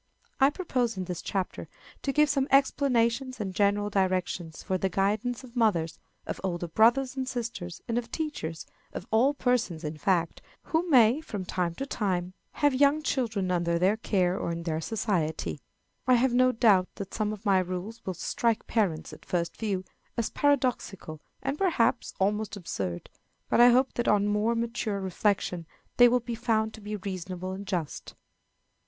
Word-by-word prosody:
I 270 0 +6
propose, 255 - -1
in 185 - -2
this 180 -2 -5
chapter, 190 -2 -3 0.3
to 275 - -1
give 300 +2 +4
some 275 -1 +1
explanations 260 -2 +2
and 195 -3 -3
general 205 +1 +1
directions 185 -4 -1
for 190 - -1
the 190 - 0
guidance 215 +7 0
of 250 -1 -13
mothers, 175 -9 +1 0.3
of - - -5
older 175 -2 -2
brothers 240 +8 +3
and 260 -1 -2
sisters, 225 -9 -5
and 235 0 +1
of 235 - -8
teachers 295 - -4 0.3
of - - -6
all 255 +6 +4
persons, 235 - 0
in 150 0 -5
fact, 170 +1 0 0.2
who 330 +2 -1
may, 250 0 +5
from 205 -11 -5
time 180 -2 -1
to 275 - -4
time, 185 -8 -2 0.2
have 290 -2 +2
young 285 +3 +3
children 220 -10 -1
under 170 -1 +1
their 185 +4 +3
care 185 -4 0
or - - -2
in 170 0 -4
their 160 -1 -2
society. 175 -7 -1 0.5
I 255 - +6
have 245 +1 +2
no 255 +1 +5
doubt 210 -6 +4
that 195 -1 -7
some 215 -1 -1
of 215 +1 -8
my 195 -2 +4
rules 185 +5 -4
will 185 - -4
strike 230 +6 0
parents, 190 -9 -1
at - - -12
first 170 -1 -2
view, 195 -4 -2 0.3
as 235 - -1
paradoxical 250 - 0 0.2
and, 280 +2 -2
perhaps, 325 -12 +1
almost 210 +2 0
absurd; 95 - -4 0.4
but - - +4
I 245 - +9
hope 255 +2 +3
that 240 - -2
on 205 -1 +4
more 210 +3 +1
mature 230 -3 -2
reflection 190 -2 -1 0.3
they 245 - +9
will 250 +1 +2
be 240 0 -5
found 220 -1 0
to 220 - -11
be 210 +1 -4
reasonable 185 -2 -5
and 195 +1 -7
just. 170 -6 -4
210 Hz, 175 wpm, -28 LUFS, 185-245 Hz, 0.5 s, I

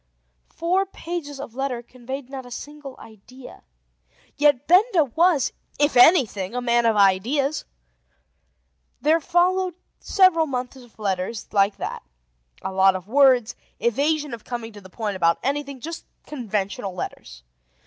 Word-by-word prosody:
Four 370 +4 0
pages 330 -6 -6
of 270 -5 -8
letter 255 -2 -3
conveyed 255 +2 -8
not 265 -1 -7
a 245 - -13
single 285 +1 -9
idea. 240 +4 -14 0.7
Yet 290 -2 +3
Benda 365 0 +5
was, 305 +2 +2 0.2
if 290 +1 +2
anything, 245 - +4
a - - 0
man 240 -1 +2
of 225 - +2
ideas. 230 +10 +2 1.3
There 320 +2 +2
followed 360 +2 +1 0.2
several 370 -5 +3
months 250 -1 -4
of 245 -3 -16
letters 200 +1 -3
like 200 0 +2
that: - - -5 0.6
a - - -3
lot 190 0 +4
of 185 0 -7
words, 255 -2 +4 0.2
evasion 290 +4 0
of 230 - -8
coming 235 -2 -6
to 205 - -12
the 185 - -14
point 205 -1 -4
about 170 -1 +3
anything; 280 0 -2
just 330 +6 -7 0.2
conventional 200 -7 -4
letters. - - -7
255 Hz, 140 wpm, -23 LUFS, 215-300 Hz, 1.3 s, Benda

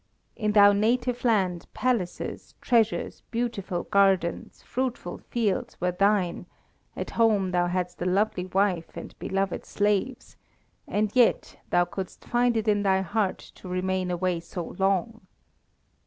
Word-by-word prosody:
In 210 -2 -1
thy 205 -1 +7
native 240 +4 +1
land 190 -7 +1
palaces, 235 -9 -2
treasures, 230 -3 +1
beautiful 220 -7 -2
gardens, 195 -4 +1
fruitful 255 -1 -3
fields 220 -6 -2
were 180 0 +1
thine; 195 -1 +1 0.5
at - - -5
home 210 -5 +2
thou 175 -1 +2
hadst 180 0 -3
a - - -1
lovely 185 0 +1
wife 185 -3 0
and - - -8
beloved 195 -1 -2
slaves, 205 +5 -1 0.5
and 210 +1 -1
yet 245 -2 +2
thou 175 0 +3
couldst 185 +1 -7
find 240 -1 +2
it 220 0 -2
in 205 -1 +3
thy 190 -1 +2
heart 195 +1 -1
to - - -14
remain 185 0 -1
away 180 0 0
so 170 0 -7
long. 195 +4 0
200 Hz, 135 wpm, -26 LUFS, 180-225 Hz, 0.5 s, thy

